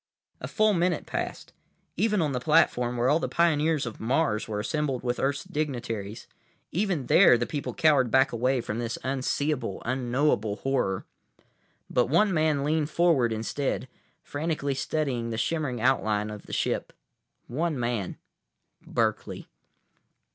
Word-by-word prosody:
A - - -5
full 215 -2 +2
minute 175 -2 0
passed. - - -5 0.4
Even 210 -1 +2
on 150 - 0
the 125 - -1
platform, 125 -4 +2
where 120 +1 +2
all 150 +4 +4
the - - -2
pioneers 160 -3 +2
of 120 - -7
Mars 115 -3 0
were 105 -2 -3
assembled 135 +2 -2
with 125 0 -1
Earth's 140 +1 0
dignitaries, 120 -8 -4 0.5
even 180 -7 -1
there 120 - +6
the 120 - -1
people 145 +1 -4
cowered 150 -7 +4
back 130 +3 +4
away 125 +2 +1
from 115 0 -4
this 115 -1 -3
unseeable, 135 +2 -1
unknowable 125 -3 0
horror. 105 -5 -1 0.8
But 125 - +1
one 190 +7 +3
man 155 -3 +2
leaned 155 0 0
forward 165 -10 +3
instead, 120 +5 -2 0.4
frantically 145 -2 -2
studying 130 -3 -2
the 110 - -3
shimmering 130 0 -1
outline 110 -4 +1
of 105 -1 -9
the - - -10
ship. - - -1 0.5
One 155 +2 -2
man—Berkeley. 110 - -4
135 Hz, 140 wpm, -27 LUFS, 120-155 Hz, 0.8 s, there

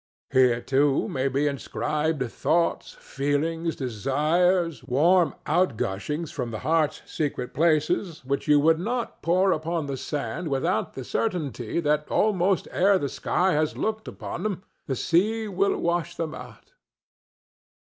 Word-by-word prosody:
Here, 125 -3 +4
too, 140 +2 +2
may 130 0 -1
be 135 +2 0
inscribed 150 +1 -1
thoughts, 170 0 0
feelings, 160 +4 -2
desires, 150 - +1
warm 165 +7 +3
outgushings 150 - -1
from 125 -3 -4
the 110 - -4
heart's 160 -2 +1
secret 145 -5 -3
places, 155 0 +1
which 140 +3 -2
you 150 -1 +6
would 160 +2 +4
not 235 +5 -3
pour 185 +3 +3
upon 165 -1 -1
the 140 -1 -4
sand 140 +2 -4
without 135 -2 -1
the 130 - -5
certainty 150 - -2
that 150 -1 0
almost 195 -3 +2
ere 195 +2 +4
the 140 -5 -2
sky 185 +7 0
has 155 0 0
looked 220 0 -2
upon - - -6
them 195 -2 -3 0.2
the 135 - -1
sea 215 - +1
will 200 0 +1
wash 170 -1 -1
them 160 -2 -3
out. - - -12
155 Hz, 135 wpm, -25 LUFS, 140-175 Hz, 0.2 s, you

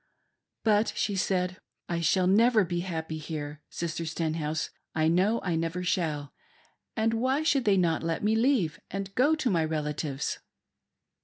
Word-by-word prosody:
" - - -56 0.2
But," 215 0 +3
she 205 - 0
said, 185 -1 0 0.3
"I 170 -1 -1
shall 175 +3 +2
never 215 +2 +5
be 175 0 -2
happy 160 -3 -4
here, 150 -1 -6
Sister 170 0 -3
Stenhouse, 160 -1 -2 0.2
I 155 0 +2
know 190 +7 +3
I 175 -3 0
never 165 +2 -2
shall; 155 -6 -1 0.6
and 225 +1 +2
why 260 +6 +1
should 280 -5 +2
they 200 -2 +4
not 170 -3 +2
let 165 +1 -2
me 215 +1 +3
leave 225 - +2
and 195 0 -5
go 290 +8 +4
to 265 -7 0
my 165 -3 +2
relatives 150 -2 -2
175 Hz, 160 wpm, -28 LUFS, 160-215 Hz, 0.6 s, never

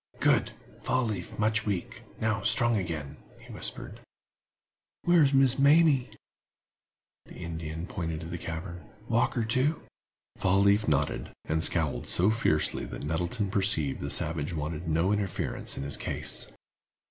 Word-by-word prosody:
"Good! - - +2 0.3
Fall 130 0 0
leaf 100 -6 -5
much 110 0 +2
weak; 95 -4 -3 0.2
now 110 -2 0
strong 120 +3 +2
again," 80 -8 -4 0.2
he - - -13
whispered. - - -4 1.0
"Where's 165 -5 +5
Miss 135 -1 +3
Mamie?" 145 -2 +5 1.2
The - - -13
Indian 80 -1 -5
pointed 80 -4 -4
to - - -7
the 85 +1 -5
cavern. 85 +2 -6 0.2
"Walker, 115 0 +1
too?" 130 +8 0 0.5
Fall 95 +1 +2
leaf 100 +1 +3
nodded, 75 -1 0 0.2
and 80 +1 0
scowled 80 -3 +1
so 95 +5 +3
fiercely 80 -9 +1
that - - -7
Nettleton 90 +7 -2
perceived 95 -9 +1
the - - -4
savage 75 0 0
wanted 80 +2 -4
no 85 +4 +2
interference 100 -3 -2
in - - -3
his 70 - +3
case. - - -2
95 Hz, 135 wpm, -28 LUFS, 80-110 Hz, 1.2 s, Where's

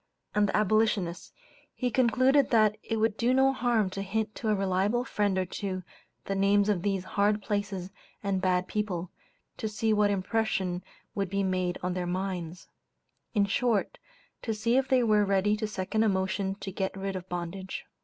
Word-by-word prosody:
and 205 -1 +3
the - - +1
Abolitionists, 210 -4 +1 0.4
he 250 -2 -1
concluded 260 +4 +3
that 215 -3 +4
it 225 - -2
would 220 -1 +1
do 245 +2 +2
no 270 0 +4
harm 235 -4 +1
to 195 - -4
hint 215 +2 -2
to 220 - -3
a 210 - +3
reliable 195 +5 +1
friend 205 -6 0
or 185 - +1
two 185 0 -4 0.4
the 195 - -2
names 200 +1 +3
of 195 -4 +1
these 195 -1 -1
hard 205 +2 +1
places 195 -3 -2 0.3
and 195 -2 0
bad 185 -1 +1
people, 185 -5 -3 0.5
to 220 - -3
see 220 +1 0
what 210 -1 +3
impression 190 -2 -1 0.3
would 195 -2 -2
be 200 +1 0
made 185 -1 0
on 180 0 0
their 180 -1 -2
minds; 180 -2 -4 0.7
in 205 -1 +4
short, 215 +1 0 0.4
to 225 -2 -2
see 230 +3 +1
if 265 0 +3
they 260 -2 +3
were 215 -2 +4
ready 200 +1 +2
to 215 0 -2
second 210 +1 -1
a 220 - +4
motion 190 0 -1
to 195 -1 -7
get 190 +1 -3
rid 195 0 -3
of 185 0 -6
bondage. 180 +2 -5
200 Hz, 185 wpm, -29 LUFS, 190-220 Hz, 0.7 s, that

